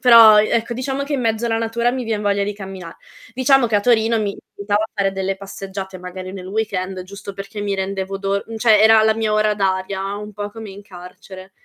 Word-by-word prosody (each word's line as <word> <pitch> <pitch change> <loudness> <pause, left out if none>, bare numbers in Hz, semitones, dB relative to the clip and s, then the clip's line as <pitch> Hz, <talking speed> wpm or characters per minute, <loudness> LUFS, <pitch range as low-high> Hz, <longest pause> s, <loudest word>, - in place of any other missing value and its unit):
però, 230 -4 +8
e 215 - 0
ecco, 235 +1 0
diciamo 265 +3 -3
che 290 - -5
in 280 - 0
mezzo 225 0 0
alla 225 -1 0
natura 230 +1 0
mi 260 0 -3
vien 220 -3 -2
voglia 200 -1 +1
di 205 +1 -2
cammina 190 -4 -9 0.4
diciamo 260 +1 +3
che 215 - +2
a 205 - +2
Torino 230 0 +3
mi 200 -2 -2 0.2
aiutava 205 +1 0
a 220 - -5
fare 200 -2 0
delle 190 0 -2
passeggiate 195 -1 -7
magari 185 +1 -8
nel 185 -2 -8
weekend 195 -3 -3
giusto 200 +1 -9
perché 200 +2 -7
mi 205 -1 -1
rendevo 195 0 -3
do 200 0 -1 0.2
cioè 220 -2 +5
era 220 0 +7
la 220 0 +3
mia 220 -1 -1
ora 215 0 +2
d'aria, 195 0 -1
un 210 +1 -8
po' 205 +1 -5
come 220 -1 -9
in 195 +1 -11
carcere. 185 0 -12
205 Hz, 220 wpm, -20 LUFS, 195-225 Hz, 0.4 s, però